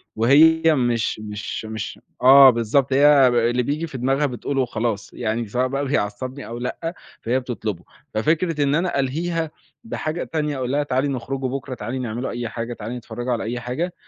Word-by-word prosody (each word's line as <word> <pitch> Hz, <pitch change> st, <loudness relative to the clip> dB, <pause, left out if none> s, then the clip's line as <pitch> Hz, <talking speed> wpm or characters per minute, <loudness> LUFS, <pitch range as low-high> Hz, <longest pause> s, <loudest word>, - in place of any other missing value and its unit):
وهي 150 Hz, +8 st, +5 dB
مش 120 Hz, -4 st, 0 dB
مش 105 Hz, +1 st, -5 dB
مش 110 Hz, -1 st, -6 dB, 0.2 s
آه، 135 Hz, +1 st, +9 dB
بالضبط 125 Hz, +3 st, +1 dB
هي 140 Hz, -1 st, +6 dB
اللي 120 Hz, 0 st, +2 dB
بييجي 150 Hz, +5 st, -2 dB
في 140 Hz, -, -7 dB
دماغها 135 Hz, +4 st, +1 dB
بتقوله 135 Hz, +1 st, -2 dB
وخلاص 115 Hz, -3 st, -2 dB
يعني 115 Hz, 0 st, -2 dB
سواء 125 Hz, +5 st, 0 dB
بقى 140 Hz, +2 st, -2 dB
بيعصّبني 130 Hz, +2 st, -2 dB
أو 115 Hz, +1 st, -6 dB
لأ، 165 Hz, +8 st, -4 dB, 0.3 s
فهي 125 Hz, +3 st, +1 dB
بتطلبه 110 Hz, -8 st, -5 dB, 0.3 s
ففكرة 155 Hz, +6 st, +1 dB
إن 140 Hz, +1 st, +2 dB
أنا 175 Hz, -3 st, 0 dB
ألهيها 160 Hz, +4 st, -1 dB, 0.3 s
بحاجة 170 Hz, -7 st, -3 dB
تانية 150 Hz, -3 st, -2 dB
أقول 130 Hz, 0 st, -2 dB
لها 145 Hz, +1 st, +1 dB
تعالي 135 Hz, 0 st, 0 dB
نخرجوا 130 Hz, 0 st, -3 dB
بُكرة، 135 Hz, 0 st, -5 dB
تعالي 130 Hz, +2 st, -4 dB
نعملوا 120 Hz, +1 st, -3 dB
أي 120 Hz, -1 st, -4 dB
حاجة، 115 Hz, 0 st, -4 dB
تعالي 115 Hz, +2 st, -6 dB
نتفرّجوا 120 Hz, +1 st, -5 dB
على 115 Hz, -, -2 dB
أي 120 Hz, +2 st, -3 dB
حاجة، 135 Hz, +9 st, -3 dB
130 Hz, 175 wpm, -22 LUFS, 120-145 Hz, 0.3 s, آه